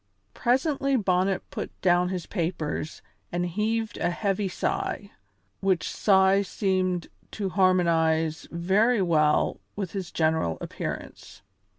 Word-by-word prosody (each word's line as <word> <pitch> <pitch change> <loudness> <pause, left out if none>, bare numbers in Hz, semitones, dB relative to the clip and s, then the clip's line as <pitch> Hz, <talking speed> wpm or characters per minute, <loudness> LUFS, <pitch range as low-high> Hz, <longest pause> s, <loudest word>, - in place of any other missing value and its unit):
Presently 275 +2 +1
Bonnet 190 -3 +1
put - - -6
down 180 0 +3
his 185 -3 -3
papers 165 -4 -3 0.3
and 175 0 -1
heaved 215 +5 -1
a - - +1
heavy 195 +2 -1
sigh, 380 - -3 0.5
which 185 -5 +1
sigh 190 -1 +4
seemed 185 -3 -1 0.2
to 200 -3 -3
harmonize 165 -4 +2
very 195 +6 +2
well 155 -3 +2 0.2
with 195 -4 -4
his 190 -4 -4
general 160 - +1
appearance. - - -7
185 Hz, 110 wpm, -26 LUFS, 170-205 Hz, 0.5 s, sigh